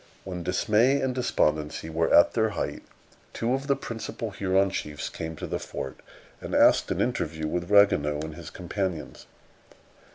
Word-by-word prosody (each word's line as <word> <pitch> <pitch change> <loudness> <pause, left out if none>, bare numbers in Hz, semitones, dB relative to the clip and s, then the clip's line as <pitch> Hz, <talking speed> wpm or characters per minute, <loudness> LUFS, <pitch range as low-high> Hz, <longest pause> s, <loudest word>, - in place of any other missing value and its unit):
When 90 -2 -5
dismay 110 +9 +2
and 130 -1 0
despondency 75 -12 0
were 80 +1 0
at 85 - +6
their 110 -1 +2
height, - - -3 0.5
two 115 +2 -1
of 135 +1 -2
the 140 - +3
principal 115 -3 -5
Huron 95 0 +1
chiefs 75 -5 -4
came 80 0 -6
to - - -6
the - - -3
fort, 65 - -6 0.4
and - - -4
asked - - +5
an - - -1
interview 80 0 -1
with 85 +3 -3
Ragueneau 75 -8 +4
and 80 0 -5
his 85 0 -9
companions. 90 -2 -4
90 Hz, 160 wpm, -27 LUFS, 80-110 Hz, 0.5 s, at